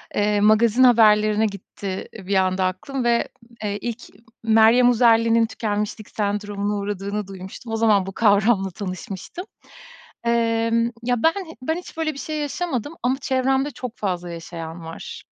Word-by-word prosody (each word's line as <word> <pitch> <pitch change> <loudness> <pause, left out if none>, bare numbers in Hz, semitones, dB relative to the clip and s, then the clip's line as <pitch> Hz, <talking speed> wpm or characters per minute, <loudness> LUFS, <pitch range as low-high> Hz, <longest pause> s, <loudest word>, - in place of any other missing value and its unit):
eee, 205 0 +2
magazin 220 +3 +4
haberlerine 215 -3 +5
gitti 200 -1 -6
bir 195 -1 -3
anda 185 0 +2
aklım 245 +9 -3
ve, 235 0 +2 0.4
eee, 205 -1 -2
ilk 235 0 -4 0.4
Meryem 225 +2 +5
Uzerli'nin 230 -1 +4
tükenmişlik 210 -1 -3
sendromuna 205 0 -2
uğradığını 200 0 -3
duymuştum. 195 +4 -8
O - - +1
zaman 215 -4 +3
bu 195 - -5
kavramla 200 -2 +3
tanışmıştım. 190 - -7 0.8
Emm, 230 0 +1
ya, 245 -1 0
ben 325 - +5 0.3
ben 320 +5 -1
hiç 355 -2 -10
böyle 315 -1 -1
bir 275 - -12
şey 310 +1 -4
yaşamadım 290 -2 -3
ama 255 +1 +2
çevremde 265 +2 +1
çok 250 -2 -7
fazla 180 -3 -3
yaşayan 165 0 -7
var. 165 - -8
220 Hz, 140 wpm, -22 LUFS, 200-240 Hz, 0.8 s, haberlerine